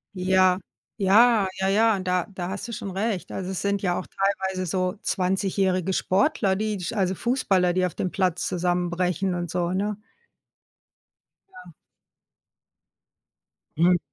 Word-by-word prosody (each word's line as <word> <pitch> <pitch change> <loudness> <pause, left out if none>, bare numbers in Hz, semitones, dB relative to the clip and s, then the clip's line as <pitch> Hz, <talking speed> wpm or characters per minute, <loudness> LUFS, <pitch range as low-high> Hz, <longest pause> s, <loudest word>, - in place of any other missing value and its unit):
Ja, 185 0 +3 0.4
ja, 210 +1 +5
ja, 190 - +1
ja, 215 0 +3
da 180 -1 0
da 180 -1 -4
hast 200 +5 -5
du - - -7
schon 205 - -5
recht. 195 0 -2
Also, 190 0 -4
es 190 - -3
sind 200 0 0
ja 175 -1 +1
auch - - -8
teilweise 190 -1 -1
so 185 +2 -1
zwanzigjährige 190 -1 0
Sportler, 195 0 +1
die 215 0 -2
sch 185 +6 -4
also 190 -3 +1
Fußballer, 190 -7 +1
die 185 0 +2
auf 180 - -3
dem 185 - -2
Platz 180 -2 0
zusammenbrechen 180 +1 0
und 175 -1 -3
so, 175 -1 -1
ne? 205 +2 -2 1.5
Ja. 365 0 -13 2.0
Mhm. 175 +1 +4
190 Hz, 140 wpm, -25 LUFS, 180-200 Hz, 2.0 s, ja